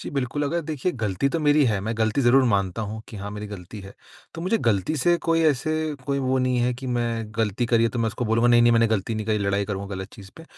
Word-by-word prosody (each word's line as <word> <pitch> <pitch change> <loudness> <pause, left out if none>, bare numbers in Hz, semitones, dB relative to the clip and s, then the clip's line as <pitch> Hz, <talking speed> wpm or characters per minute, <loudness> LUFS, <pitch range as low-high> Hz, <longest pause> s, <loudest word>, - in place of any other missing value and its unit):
जी, - - -6
बिल्कुल 140 +1 -2
अगर 170 +4 -1
देखिए 155 +4 -1
गलती 105 +4 0
तो 165 - -1
मेरी 150 -1 +4
है, 105 -4 0
मैं 110 +3 -3
गलती 110 +4 +1
ज़रूर 130 +1 +5
मानता 100 +1 0
हूँ 110 +1 -5
कि 110 - -9
हाँ, 100 +1 -6
मेरी 105 0 -6
गलती 100 0 -9
है। 100 +1 -12 0.4
तो 165 - -6
मुझे 220 +5 +1
गलती 115 - 0
से 175 +5 +3
कोई 165 0 +3
ऐसे 155 +2 +1 0.3
कोई 140 0 0
वो 130 0 0
नहीं 130 -1 +1
है 120 +1 +1
कि 130 +1 -8
मैं 120 -2 -1
गलती 110 +2 0
करी 115 -1 +3
है - - +3
तो 120 - -4
मैं 115 - +1
उसको 115 +3 -4
बोलूँगा 115 +2 +2
नहीं-नहीं 120 0 +5
मैंने 115 0 +4
गलती 110 0 -1
नहीं 110 -1 -4
करी 110 -1 +1
लड़ाई 100 0 0
करूँगा 100 -1 -5
गलत 95 0 -6
चीज़ 100 -4 -13
पे। 160 - -11
115 Hz, 265 wpm, -24 LUFS, 105-135 Hz, 0.4 s, ज़रूर